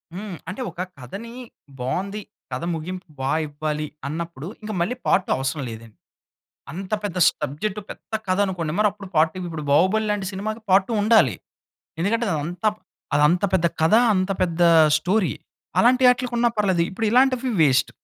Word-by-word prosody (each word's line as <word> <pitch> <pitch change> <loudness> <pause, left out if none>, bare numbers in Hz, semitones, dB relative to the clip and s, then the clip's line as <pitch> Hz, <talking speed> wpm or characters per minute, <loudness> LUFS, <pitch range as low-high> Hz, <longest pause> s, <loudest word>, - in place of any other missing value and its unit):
హ్మ్, 200 -2 -6
అంటే 205 +8 -5
ఒక 180 - -6 0.2
కథని 205 - -8 0.5
బావుంది. 195 +11 -3 0.3
కథ 125 +5 -4
ముగింపు 180 +3 -6
బా 135 +1 -1 0.2
ఇవ్వాలి. 150 +1 -3 0.2
అన్నప్పుడు 165 0 -5
ఇంక 215 0 -6
మళ్ళీ 240 +9 0
పార్ట్ 185 - +3
2 - - -2
అవసరం 135 +2 -2
లేదండి. 110 -1 -10 0.8
అంత 190 +5 -6
పెద్ద 190 -3 -3
స్టబ్జెక్ట్ 155 +9 -2
పెద్ద - - -11
కథ 185 +1 +1
అనుకోండి, 170 -5 -3
మరి 210 - +5
అప్పుడు 205 -2 -11
పార్ట్ 160 +1 +4
2, 185 - -7
ఇప్పుడు 155 -2 -5
'బాహుబలి' 200 +8 +3
లాంటి 205 -2 -2
సినిమాకి 215 +4 -4
పార్ట్ 190 +1 +5
2 235 - -3
ఉండాలి. 220 +1 +4 0.7
ఎందుకంటే 230 +6 +1
అది 170 - 0
అంత, 175 +3 -7 0.5
అది 145 - +3
అంత 175 +4 +1
పెద్ద 170 -2 +3 0.2
కథ, 165 +6 +4 0.2
అంత 185 +1 0
పెద్ద 175 -1 -1 0.4
స్టోరీ 185 +4 +1 0.5
అలాంటి 255 +2 +4
ఆటిలకి 250 -1 -1
ఉన్నా 240 0 +4
పర్లేదు 190 -5 +2
ఇప్పుడు 220 +3 -2
ఇలాంటివి 255 +1 +3
వేస్ట్. 135 -2 +3
185 Hz, 165 wpm, -23 LUFS, 155-215 Hz, 0.8 s, మరి